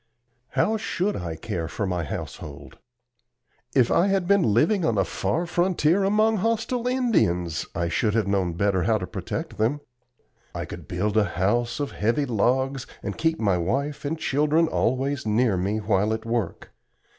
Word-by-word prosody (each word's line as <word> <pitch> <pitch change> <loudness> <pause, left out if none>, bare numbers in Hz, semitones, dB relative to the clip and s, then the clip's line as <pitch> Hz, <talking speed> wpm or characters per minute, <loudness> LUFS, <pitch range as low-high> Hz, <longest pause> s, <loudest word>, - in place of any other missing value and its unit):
How 220 +1 +3
should 210 -2 -1
I 85 -3 -4
care 80 +1 -4
for 100 +5 -3
my 90 -3 -1
household? 75 -1 -7 1.0
If 125 -4 +4
I 180 - +4
had 195 -3 +1
been 200 0 +4
living 160 - +3
on 115 -8 +1
a 95 - +3
far 100 - -1
frontier 175 +1 +2
among 215 +3 +3
hostile 230 +4 0
Indians 90 - +1
I 85 - 0
should 105 +5 0
have 110 -3 +2
known 95 -3 0
better 95 +1 +1
how 110 +4 +2
to 90 - -4
protect - - -5
them. 120 +7 +1 0.8
I - - -3
could - - -9
build 105 +4 -1
a 105 - +4
house 120 +6 +1
of 145 -1 -2
heavy 115 +7 0
logs 130 +3 0 0.2
and - - -3
keep 160 0 0
my 100 -5 +2
wife 140 - -2
and 150 +3 -2
children 150 +2 +2
always 130 -1 0
near 110 0 +2
me 95 +4 0
while 105 0 +1
at 110 0 -8
work. 115 -2 -3
120 Hz, 170 wpm, -25 LUFS, 100-165 Hz, 1.0 s, If